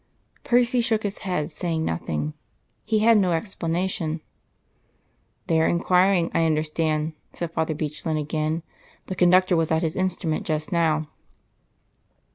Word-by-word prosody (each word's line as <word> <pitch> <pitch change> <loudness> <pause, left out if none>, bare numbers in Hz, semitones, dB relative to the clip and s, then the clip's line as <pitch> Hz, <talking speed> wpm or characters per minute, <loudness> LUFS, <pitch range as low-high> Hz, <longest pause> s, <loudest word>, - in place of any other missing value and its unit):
Percy 245 0 +3
shook 220 -2 +1
his 205 -1 -3
head, 180 -6 -2
saying 160 0 -2
nothing. 75 -2 -2 0.5
He 215 -1 +1
had 230 -2 +6
no 185 -3 +2
explanation. 165 -2 -2 1.2
"They 160 -1 +2
are - - +3
inquiring, 180 0 +3
I 165 - +2
understand," 155 0 0 0.2
said 170 -1 -4
Father 160 -1 -1
Bechlin 155 +1 -2
again. 155 +2 -2 0.4
"The 185 - -5
conductor 180 +1 +4
was 165 -1 +1
at 160 +1 +2
his 160 -1 -1
instrument 180 -4 -1
just 155 -1 -2
now." 160 -3 +1
165 Hz, 130 wpm, -24 LUFS, 155-185 Hz, 1.2 s, had